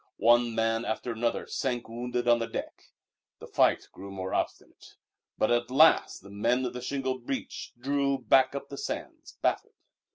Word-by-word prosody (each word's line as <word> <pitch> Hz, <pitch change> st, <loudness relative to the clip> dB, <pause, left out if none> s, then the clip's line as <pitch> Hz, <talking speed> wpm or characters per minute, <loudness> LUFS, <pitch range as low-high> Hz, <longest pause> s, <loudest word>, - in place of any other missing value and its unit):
One 120 Hz, +1 st, +4 dB
man 115 Hz, 0 st, +1 dB
after 120 Hz, +1 st, -3 dB
another 115 Hz, +1 st, -1 dB
sank 125 Hz, -3 st, -2 dB
wounded 120 Hz, +1 st, -3 dB
on 120 Hz, 0 st, +5 dB
the 115 Hz, -, -2 dB
deck. -, -, -6 dB, 0.5 s
The -, -, -11 dB
fight -, -, +2 dB
grew 100 Hz, +1 st, -10 dB
more 95 Hz, -1 st, -5 dB
obstinate, -, -, -4 dB, 0.4 s
but 110 Hz, -, +2 dB
at 120 Hz, 0 st, +1 dB
last 150 Hz, -, +4 dB
the 100 Hz, -, -12 dB
men 120 Hz, +5 st, +1 dB
of 125 Hz, -, -3 dB
the 130 Hz, 0 st, -3 dB
beach 130 Hz, +2 st, -5 dB
drew 140 Hz, +1 st, +1 dB
back 130 Hz, +2 st, +3 dB
up 140 Hz, 0 st, -6 dB
the 140 Hz, -, -7 dB
sands, -, -, -6 dB
baffled. -, -, 0 dB
120 Hz, 165 wpm, -28 LUFS, 115-130 Hz, 0.5 s, on